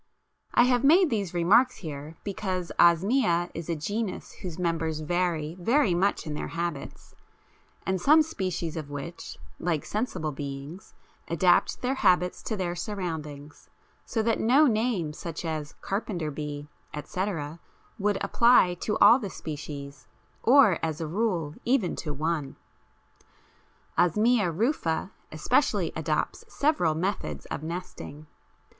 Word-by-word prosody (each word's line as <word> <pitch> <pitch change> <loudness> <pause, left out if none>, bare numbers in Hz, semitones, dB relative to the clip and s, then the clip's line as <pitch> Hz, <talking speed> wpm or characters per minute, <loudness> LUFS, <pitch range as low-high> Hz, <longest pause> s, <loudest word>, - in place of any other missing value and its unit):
I - - +7
have 250 0 +2
made 335 +4 +5
these 200 -6 -1
remarks 210 +9 +4
here 155 -1 -7
because 185 -3 -3
Osmia 175 0 +4
is 165 0 -6
a 170 - 0
genus 205 +7 -3
whose 175 -4 -8
members 165 -3 -1
vary 165 -1 -1
very 230 +1 +3
much 190 +3 +1
in 155 - -4
their 150 - -4
habits, 170 -5 -5 0.7
and 190 -1 -1
some 310 - +6
species 185 - -3
of 155 -3 -5
which, 145 +4 -7 0.2
like 165 -4 -1
sensible 190 -8 -2
beings, 140 +4 -7 0.3
adapt 175 +7 +2
their 250 +2 +1
habits 180 -8 +2
to 220 - -2
their 175 -2 -1
surroundings, 160 -7 -6 0.3
so 225 - -1
that 230 0 +1
no 265 +7 +5
name 215 - 0
such 165 +1 -6
as 155 -2 -4
carpenter 190 -6 -3
bee, 145 0 -5 0.3
etc., 165 -1 -4 0.4
would 205 0 +1
apply 235 -7 +5
to 210 - -1
all 240 - +7
the 205 -6 -5
species, 145 -3 -7 0.3
or, 240 - +6
as 160 -2 -2
a 165 - -2
rule, 170 -4 -1
even 240 -7 +1
to 155 - -4
one. 150 -1 -2 1.4
Osmia 210 +3 +3
rufa 185 - -1 0.2
especially - - +1
adopts - - -2
several 285 - +1
methods 160 - -3
of - - -3
nesting. 160 -2 -7
175 Hz, 130 wpm, -27 LUFS, 155-210 Hz, 1.4 s, I